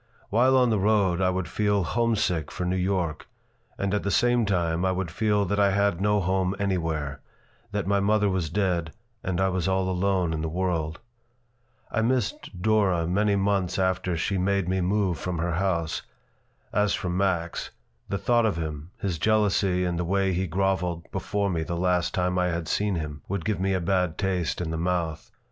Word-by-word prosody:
While 130 +5 +4
on 125 -2 +4
the 110 - +2
road 95 -3 +2
I 90 - +3
would 95 -1 -2
feel 105 -2 +1
homesick 105 - 0
for 90 - -4
New 90 +1 0
York, 90 -3 -1 0.5
and 100 0 -1
at 105 - +1
the 100 - -2
same 120 +1 +3
time 85 -3 0
I 95 - +2
would 95 -3 -2
feel 105 +2 +1
that 100 +2 -1
I 100 -1 +5
had 100 -2 +1
no 105 +1 +3
home 95 0 0
anywhere, 80 -8 -2 0.5
that 105 -3 -2
my 100 +1 +2
mother 105 +1 +2
was 95 -4 -1
dead 85 -3 0 0.3
and 90 -1 -1
I 95 0 +3
was 95 -2 -1
all 95 0 +1
alone 95 -2 +1
in 80 - -2
the 80 - -2
world. 80 -2 -1 0.9
I 110 - +1
missed 110 -6 -1
Dora 100 -6 +3
many 100 +4 +2
months 95 -2 0
after 95 -2 0
she 95 +4 -1
made 100 -1 +1
me 95 0 0
move 95 -1 +1
from 90 -1 -3
her 85 +1 -1
house. 85 -2 0 0.7
As 105 0 +2
for 90 - -3
Max, 90 -2 -1 0.4
the 100 - -1
thought 120 +1 +2
of 100 - -1
him, 80 -1 -5
his 90 -5 -3
jealousy 100 -3 +2
and 85 -1 -1
the - - 0
way 95 +2 +1
he 95 +2 -1
groveled 90 -1 -1
before 100 -1 -1
me 85 -2 -1
the 85 +1 -3
last 90 -1 +1
time 90 0 +1
I 90 - +2
had 85 -2 -2
seen 105 -2 0
him, 75 -3 -5
would 100 -3 -3
give 105 -3 0
me 95 0 +1
a - - +1
bad 90 -1 0
taste 95 -4 -1
in 80 -2 -3
the 80 - -2
mouth. 85 -2 -2
95 Hz, 195 wpm, -26 LUFS, 85-100 Hz, 0.9 s, I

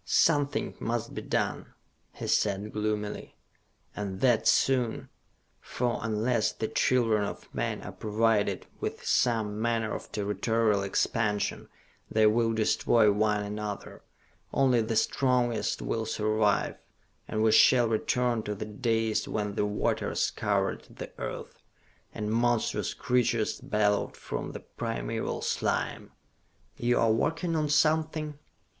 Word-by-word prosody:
"Something 145 -3 +2
must 115 0 -2
be - - -4
done," - - -2 0.4
he - - -7
said 105 +1 0
gloomily, 105 -1 -3 0.6
"and 100 -2 -4
that 120 -4 +3
soon! 125 -4 +2 0.5
For, 120 -1 -2
unless 110 +1 +1
the 110 - -3
children 115 -5 +2
of 100 - -6
men - - -2
are - - -6
provided 110 -1 0
with - - -4
some 110 -3 +1
manner 115 -2 0
of - - -7
territorial 105 +1 +1
expansion, 105 +1 -1 0.4
they 110 0 +3
will 115 +2 +3
destroy 110 0 +3
one 105 0 +1
another, 105 0 -6 0.5
only 130 -3 +3
the 110 +1 -2
strongest 125 0 +1
will 115 -1 -2
survive, 110 -1 +1 0.5
and 110 0 -1
we 110 - +4
shall 120 +1 +6
return 120 +1 0
to 105 -1 -4
the 105 - -5
days 110 0 0
when 105 -1 -2
the 105 - 0
waters 105 0 0
covered - - 0
the - - -9
earth, - - -6 0.5
and 105 -1 -4
monstrous 120 0 +1
creatures 120 -3 0
bellowed 105 -1 0
from - - -5
the - - -7
primeval - - -4
slime!" - - -1 0.7
"You 120 +1 +1
are 115 -1 +4
working 160 +9 0
on 155 -2 0
something?" 155 0 +1
110 Hz, 125 wpm, -28 LUFS, 105-120 Hz, 0.7 s, shall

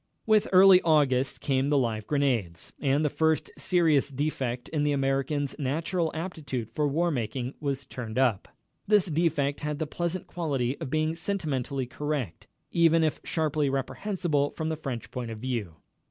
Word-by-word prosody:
With 215 -2 +4
early 185 0 +8
August 140 -5 +2
came 135 0 +1
the 145 - +3
live 110 -5 -1
grenades, 120 - -1
and 145 +2 +2
the - - +4
first 160 -1 +1
serious 160 -6 +2
defect 130 -3 -2
in 150 -2 0
the 150 0 +2
American's 135 +1 0
natural 160 +5 -1
aptitude 145 - -4
for 150 +4 0
war 170 +5 +1
making 125 0 -3
was 140 -2 -3
turned 125 -3 -6
up. 125 -7 +2 0.4
This 210 -3 +4
defect 150 -4 0
had 150 0 -3
the 160 - -2
pleasant 175 +4 -3
quality 140 -7 -2
of 155 - -4
being 155 +2 +1
sentimentally 150 -7 -2
correct, 140 - -4 0.2
even 165 -1 +4
if 155 - 0
sharply 155 -3 0
reprehensible 145 +2 -1
from 160 -1 -4
the 160 - -1
French 135 -6 -6
point 125 -2 -4
of 110 - -6
view. 110 -8 -3
145 Hz, 160 wpm, -27 LUFS, 130-160 Hz, 0.4 s, early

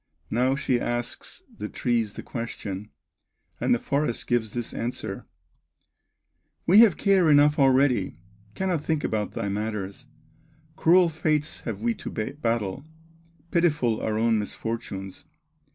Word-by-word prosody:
Now 125 +4 +2
she 130 -3 0
asks 120 0 -4
the 105 - -5
trees 115 -4 0
the - - -8
question, 105 -4 -5 0.7
And - - 0
the 120 - +5
forest 140 0 -1
gives 120 -2 +1
this 120 +1 -5
answer: 120 +2 -4 1.4
"We 195 +5 +7
have 220 -8 +7
care 190 -5 +4
enough 145 0 +5
already, 130 - +3 0.4
Cannot 180 -5 -1
think 160 -2 -1
about 105 -1 -1
thy - - -3
matters; 105 +3 -4 0.7
Cruel 175 +2 +5
fates 155 -2 -1
have 105 -4 -4
we 115 +1 +1
to - - -7
battle, 115 -1 -2 0.7
Pitiful 150 -10 +2
our 110 -1 -1
own 115 0 +2
misfortunes! 105 +2 -5
120 Hz, 125 wpm, -26 LUFS, 110-150 Hz, 1.4 s, We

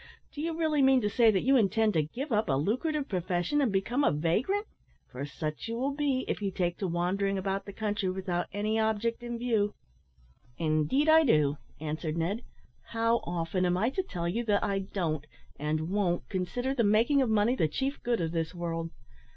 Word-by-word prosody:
Do 295 - -6
you 325 0 -2
really 310 -3 +2
mean 265 -1 +5
to 210 -1 0
say 235 -1 +5
that 195 -3 +2
you 270 +2 +4
intend 220 -1 +3
to 160 - +3
give 250 - -5
up 215 -4 +1
a - - +3
lucrative 255 - 0
profession 180 - 0
and 255 -6 +2
become 230 +8 0
a - - +5
vagrant? 215 - 0 0.5
for 135 +3 -5
such 155 +4 -5
you 230 0 -3
will 270 +3 -1
be, 275 -3 0
if - - -2
you 200 - 0
take 175 -2 -2
to 195 - -1
wandering 190 +3 0
about 195 +1 -2
the - - -5
country 205 -2 -2
without 185 -2 -2
any 215 +2 0
object 220 +2 0
in 240 0 -4
view." 225 -4 0 0.8
"Indeed, 155 - +1
I 320 +1 +7
do," 150 - +3 0.2
answered 155 +1 -3
Ned. 185 +8 -1 0.4
"How 230 +1 +1
often 175 -1 -2
am 180 0 +2
I 225 +7 +1
to 380 - 0
tell 175 - -4
you 225 +8 -1
that 205 -2 +2
I 200 -1 0
don't 165 -6 -3 0.3
and 155 +3 -1
won't 190 -4 0
consider 245 +8 -2
the 245 -4 +1
making 225 +7 +4
of 255 - +1
money 220 +3 +3
the 160 - +2
chief 270 - -3
good 235 -5 0
of 165 -1 -1
this 165 +1 -2
world? 165 -1 -3
205 Hz, 200 wpm, -29 LUFS, 175-240 Hz, 0.8 s, I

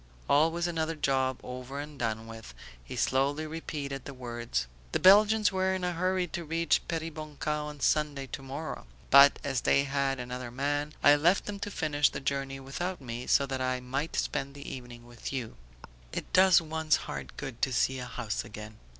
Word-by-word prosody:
"Always 165 +4 +3
another 165 -1 -1
job 135 -4 +1
over 125 +2 -6
and 150 0 -8
done 110 -1 -2
with," 115 - -10 0.3
he - - -8
slowly 140 +4 +1
repeated 145 -4 -5
the 140 - -8
words. 120 - -3 0.3
"The - - +2
Belgians 210 +2 +6
were 190 0 +1
in 185 - -4
a 180 - +1
hurry 185 +1 0
to 175 0 -4
reach 165 +1 +1
Peribonka 155 -2 -4
on 150 -1 -4
Sunday, 145 -2 +1
tomorrow; 135 +4 -6 0.2
but, 140 +1 +9
as 135 -3 -1
they 140 - +3
had 135 -1 0
another 125 0 -5
man, 145 +4 -1
I 145 - +8
left 170 +6 +3
them 205 -1 -5
to 205 - -4
finish 145 -6 +2
the - - -5
journey 135 0 -2
without 175 +7 -4
me 120 -2 -6
so 140 - +4
that 135 -1 -3
I 130 0 0
might 135 +5 -3
spend 140 +1 -2
the 140 - -9
evening 120 -2 -8
with 120 -1 -8
you. 125 -5 -4 0.6
It - - -6
does 185 -1 +7
one's 160 -1 +1
heart - - -7
good 135 -5 -6
to 130 - +2
see 130 +2 +1
a 125 - -5
house 110 -3 -3
again." 105 +1 -10
140 Hz, 185 wpm, -30 LUFS, 130-160 Hz, 0.6 s, but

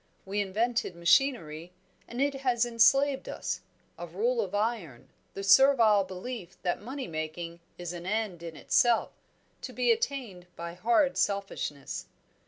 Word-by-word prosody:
We 200 +2 -1
invented 215 0 -1
machinery, 170 - +1 0.3
and 240 - -7
it 280 +1 +2
has 245 -3 +2
enslaved 265 +4 +3
us - - -4 0.4
a - - -5
rule 475 +2 0
of - - -4
iron, 205 - -2 0.3
the 195 - -5
servile 225 -2 +6
belief 185 0 -7
that 175 -2 -1
money 260 +5 -6
making 165 +1 -5 0.2
is 175 -1 -5
an 175 +1 -7
end 210 -4 -2
in 165 -2 -7
itself, 235 +8 +2 0.5
to - - -6
be 475 - +2
attained 260 - -2
by 170 0 -6
hard 235 - +2
selfishness." 195 -8 -2
210 Hz, 140 wpm, -29 LUFS, 175-250 Hz, 0.5 s, servile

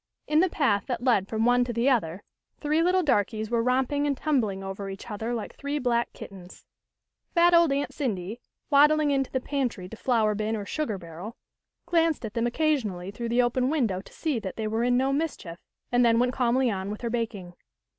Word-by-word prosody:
In 305 0 +2
the 370 +2 +4
path 215 - +1
that 245 -2 -3
led 230 -7 +3
from 220 +1 -1
one 245 0 +4
to 245 - -3
the 235 +2 0
other, 205 -8 +1 0.4
three 305 +2 +1
little 365 +2 +3
darkies 220 - 0
were 235 -1 +2
romping 265 +4 +1
and 280 -2 0
tumbling 225 -11 0
over 195 +1 -5
each 195 +4 -8
other 220 +3 -3
like 230 -3 -4
three 285 +1 -3
black 240 -3 0
kittens. 185 -2 -12 0.7
Fat 345 +1 +5
old 335 -3 +5
Aunt 280 +1 -1
Cindy, 220 -3 -3 0.3
waddling 300 +1 +5
into 270 -1 0
the 260 - -1
pantry 250 -9 -3
to 225 - -9
flour 225 -3 +1
bin 215 +2 -2
or 205 -2 -5
sugar 235 -5 -2
barrel, 175 +6 -9 0.5
glanced 330 -6 +1
at 215 - -6
them 230 +1 0
occa 310 +6 +2
sionally 190 -3 -6
through 235 +2 -4
the 245 +1 +3
open 250 +1 +1
window 230 -12 0
to - - -17
see 300 -7 -2
that 190 -4 -6
they 220 - -3
were 220 +2 -1
in 245 0 +3
no 265 +2 +1
mischief, 275 - -3 0.3
and 245 0 +4
then 230 -1 +4
went 250 +1 +2
calmly 250 0 +2
on 190 -1 -3
with 210 - -6
her 235 -2 -2
baking. 220 -7 -3
240 Hz, 210 wpm, -26 LUFS, 210-280 Hz, 0.7 s, Fat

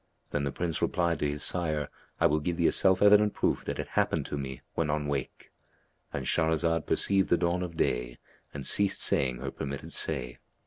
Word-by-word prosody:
Then 70 -1 -1
the 70 - -2
Prince 85 0 -3
replied 85 -4 0
to 75 - 0
his 75 0 -3
sire, 80 -5 -1 0.3
"I - - +3
will 75 +1 +3
give 85 +2 -2
thee 85 - +1
a - - +5
self 95 0 +3
evident 105 0 +5
proof - - 0
that - - -3
it - - -5
happened - - 0
to - - -4
me 65 -2 -5
when 80 -2 -1
on 75 0 -1
wake."—And 70 -3 -7
Shahrazad 80 0 +1
perceived 95 -1 +2
the 85 - +4
dawn 90 +1 0
of 85 -2 -5
day - - -1 0.3
and 70 -2 -7
ceased 100 -1 +3
saying 65 -2 +2
her 70 -1 -4
permitted 70 0 -6
say. 65 -6 -1
80 Hz, 195 wpm, -29 LUFS, 70-90 Hz, 0.3 s, a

